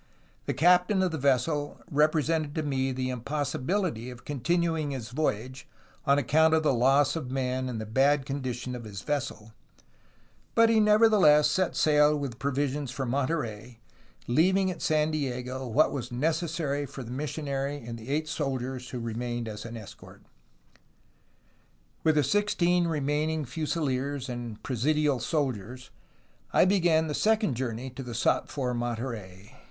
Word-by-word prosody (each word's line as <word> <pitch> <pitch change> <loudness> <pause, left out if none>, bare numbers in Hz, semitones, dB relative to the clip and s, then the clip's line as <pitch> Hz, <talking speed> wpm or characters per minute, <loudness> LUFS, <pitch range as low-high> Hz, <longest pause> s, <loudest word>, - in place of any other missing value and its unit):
The - - -1
captain 180 +3 +4
of 185 - +1
the 160 - -3
vessel 140 +2 0
represented 155 0 +1
to 155 - -1
me 135 -2 0
the 130 0 -2
impossibility 135 - -2
of 125 -1 -11
continuing 160 +2 0
his 130 -6 -5
voy 150 -2 +1
age, 130 +5 -11 0.4
on 140 0 +5
account 160 +4 +4
of 160 - +1
the 150 - +3
loss 135 +4 +3
of 150 -6 -4
men 130 -1 -1
and 115 -3 -4
the 110 - -4
bad 135 +5 +2
condition 130 -3 -4
of 120 - -7
his 100 -2 -8
vessel, 120 -7 -3 1.0
but 230 0 +6
he 225 -1 +4
nevertheless 210 -8 +5
set 185 -2 0
sail 150 0 +4
with 135 -5 -5
provisions 140 0 -1
for 130 +2 -3
Monterey, 125 -4 -2 0.5
leaving 185 +9 +3
at 175 - -8
San 155 0 +2
Diego 130 -3 -3
what 140 +7 +3
was 135 -4 -5
necessary 155 +1 -1
for 135 0 -8
the 120 - -9
missionary 140 0 -3
and 115 -3 -8
the 115 +3 -10
eight 155 +2 0
soldiers 130 -4 -3
who 125 - -5
remained 120 +1 -3
as 105 0 -7
an 115 0 -7
escort. 105 -4 -12 1.8
"With 160 -1 +3
the 150 - +4
sixteen 180 0 +2
remaining 150 0 -1
fusiliers 140 -2 -2
and 120 -3 -6
presidial 145 +2 +1
soldiers, 125 - -3 0.6
I - - +5
began 175 -4 +3
the 150 - -3
second 215 - +2
journey 125 +1 -4
to 130 - -8
the 120 -3 -6
sought 120 - +1
for 130 -3 -2
Monterey. 115 -4 -5
140 Hz, 150 wpm, -28 LUFS, 125-155 Hz, 1.8 s, but